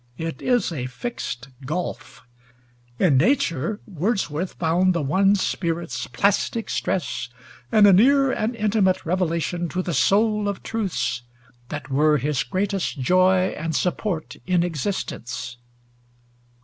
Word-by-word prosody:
It 165 -4 -5
is 245 -7 +1
a 130 -6 -3
fixed 130 - -5
gulf. 145 -4 -5 0.7
In 155 -8 +4
nature 175 - +1
Wordsworth 185 -3 -2
found 175 +2 +2
the 170 - +1
one 195 +8 +3
spirit's 165 - -2
"plastic 205 - 0
stress," 125 -9 -2 0.4
and 210 -1 +6
a 200 - +7
near 270 +7 +5
and 225 +1 -1
intimate 205 -4 +1
revelation 175 0 -1
to 185 +3 -2
the 175 - -3
soul 210 - +2
of 200 - -5
truths 160 - -2 0.5
that 145 -1 -6
were 150 +2 +4
his 145 0 0
greatest 195 -5 -2
joy 185 +6 +3
and 160 0 -4
support 180 -1 -2
in 180 -2 +3
existence. 150 - -4
180 Hz, 125 wpm, -23 LUFS, 150-200 Hz, 0.7 s, a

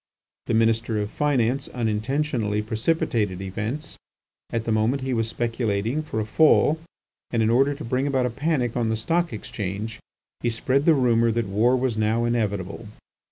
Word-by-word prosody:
The 115 - +1
Minister 115 0 +2
of 105 +1 -3
Finance 135 -3 +1
unintentionally 115 -1 -1
precipitated 110 - 0
events. 110 +10 -5 0.5
At 115 -1 -2
the 115 - -2
moment, 115 +5 +1
he 130 -1 -1
was 115 -1 0
speculating 115 +2 -1
for 150 -8 -4
a 110 - -1
fall, 155 +4 +4 0.5
and 115 -2 +1
in 110 - +2
order 135 +4 +3
to 150 - -7
bring 130 +4 0
about 135 -3 +1
a 125 - -1
panic 135 -3 -1
on 120 -2 0
the 110 - +1
Stock 165 +9 0
Exchange, 105 +1 -5 0.4
he 120 - 0
spread 130 +5 0
the 165 - +6
rumour 115 -3 +3
that 115 0 0
war 110 +6 +3
was 125 -3 0
now 110 +2 +1
inevitable. 105 -3 -2
115 Hz, 165 wpm, -24 LUFS, 110-130 Hz, 0.5 s, the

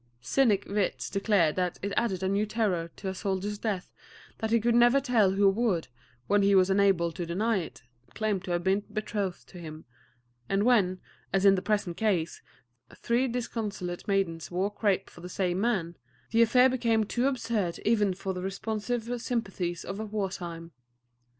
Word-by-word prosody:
Cynic 205 - +2
wits 200 -1 -2
declared 195 -6 +2
that 180 -1 -1
it 200 0 -2
added 190 -6 0
a - - +1
new 200 +2 +1
terror 200 -7 -1
to 195 - -7
a - - -3
soldier's 200 +1 -3
death 205 -5 -3 0.5
that 220 - -2
he 230 +1 +3
could 235 +2 +2
never 240 +3 +5
tell 230 -8 +3
who 200 +1 +4
would, 195 - +1 0.4
when 205 +6 +3
he 200 0 +4
was 190 0 +4
unable 190 -4 +3
to 175 +2 -5
deny 200 +6 0
it, 170 -8 -6 0.3
claim 215 -3 0
to 185 - -10
have 175 0 0
been 190 +2 +2
betrothed 210 -3 -3
to 180 - -11
him; 155 -2 -9 0.6
and 195 +1 +2
when, 200 -7 +3 0.3
as 195 0 +1
in 195 - +8
the 190 - 0
present 200 -5 -1
case, 185 -7 0 0.6
three 240 +3 +1
disconsolate 215 -7 -4
maidens 190 -5 0
wore 185 +3 -1
crape 200 -2 0
for 175 - -14
the 180 - -8
same 185 -1 -1
man, 190 -8 0 0.4
the 230 - +4
affair 250 +3 +6
became 235 -4 +1
too 240 +5 0
absurd 225 -9 -1
even 205 -4 +2
for 190 0 -4
the 180 - -5
responsive 225 +5 -3
sympathies 190 -8 -3
of 195 - -5
war 200 -3 -1
time. 170 -2 -7
200 Hz, 175 wpm, -28 LUFS, 185-225 Hz, 0.6 s, in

